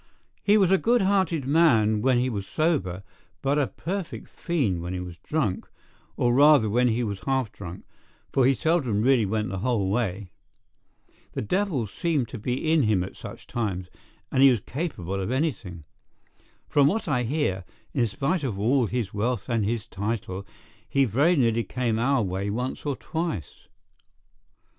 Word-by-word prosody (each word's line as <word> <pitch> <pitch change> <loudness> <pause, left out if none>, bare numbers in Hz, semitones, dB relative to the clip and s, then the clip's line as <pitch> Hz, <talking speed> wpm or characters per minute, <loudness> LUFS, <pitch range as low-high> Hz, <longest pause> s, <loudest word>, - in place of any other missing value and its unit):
"He 210 +1 +4
was 190 -3 +3
a 190 - +5
good 235 -2 +3
hearted 190 -7 +1
man 120 -9 +4
when 130 +1 +3
he 125 +1 +1
was 100 -6 -4
sober, 100 - 0 0.4
but 140 +2 +2
a 140 - +2
perfect 185 +1 -5
fiend 125 - -1
when 90 +2 -4
he - - -3
was 90 -2 -7
drunk, 110 -4 -2 0.5
or 120 0 +2
rather 145 -3 +6
when 125 +3 +3
he 120 +1 +1
was 100 -3 -3
half 130 -5 0
drunk, 90 -2 -9 0.5
for 135 - +3
he 135 - +4
seldom 135 -11 +1
really 125 -4 +4
went 105 0 -1
the 95 0 -4
whole 105 -4 0
way. 100 -4 -2 1.0
The - - -3
devil 175 - 0
seemed 135 - -1
to 120 - -7
be 125 +8 -1
in 160 - +4
him 105 -6 +2
at 95 - -8
such - - -10
times, 95 -6 -3 0.4
and 130 - +2
he 135 - +9
was 120 -6 +2
capable 100 - -4
of 95 - -3
anything. 120 - -2 0.8
From 140 -1 +4
what 215 +5 0
I 135 -5 +1
hear, 120 - -1 0.3
in 120 - +2
spite 150 - -1
of 120 -8 -2
all 120 +4 +2
his 115 -3 -3
wealth 120 +5 -2
and 115 -3 +1
his 110 +1 -1
title, 100 -2 -4 0.4
he 140 -1 +3
very 140 - +3
nearly 115 -5 +2
came 115 -3 -1
our 130 0 +2
way 95 +1 -2
once 125 +7 -3
or 140 - 0
twice. 160 - -5
120 Hz, 170 wpm, -26 LUFS, 100-145 Hz, 1.0 s, he